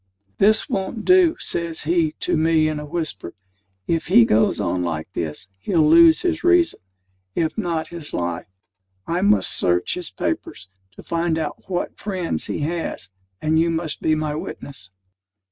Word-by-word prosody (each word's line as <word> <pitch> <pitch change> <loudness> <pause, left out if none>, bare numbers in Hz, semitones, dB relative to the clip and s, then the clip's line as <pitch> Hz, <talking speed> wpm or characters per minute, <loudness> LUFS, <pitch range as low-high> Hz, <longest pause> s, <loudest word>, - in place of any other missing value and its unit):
"This 215 +2 +4
won't 195 +3 -3
do," 365 -3 +5
says 170 -1 -3
he 165 -1 +1
to - - +1
me 160 0 +3
in 155 -1 -2
a 150 - -7
whisper. 160 - -4 0.5
"If 165 +6 -1
he 120 - +6
goes 110 0 +2
on 90 -2 -1
like 80 0 -4
this, 80 +3 -4
he'll 160 - +2
lose 165 0 +7
his 340 -2 -1
reason, 355 -1 +3 0.6
if 160 -2 0
not 170 -6 -2
his 170 -4 -5
life. 85 -1 -3 0.6
I 175 +2 -1
must 210 +2 +3
search 90 0 +1
his 180 -2 -5
papers, 95 0 -4 0.3
to - - -12
find 165 -1 -1
out 160 +3 -5
what 175 -2 -3
friends 185 -5 -3
he - - -3
has; 165 - -3 0.3
and 155 +1 +2
you 165 +1 +2
must 165 -2 -3
be 155 - +2
my 155 -1 -2
witness." 135 -8 -7
160 Hz, 160 wpm, -22 LUFS, 145-175 Hz, 0.6 s, lose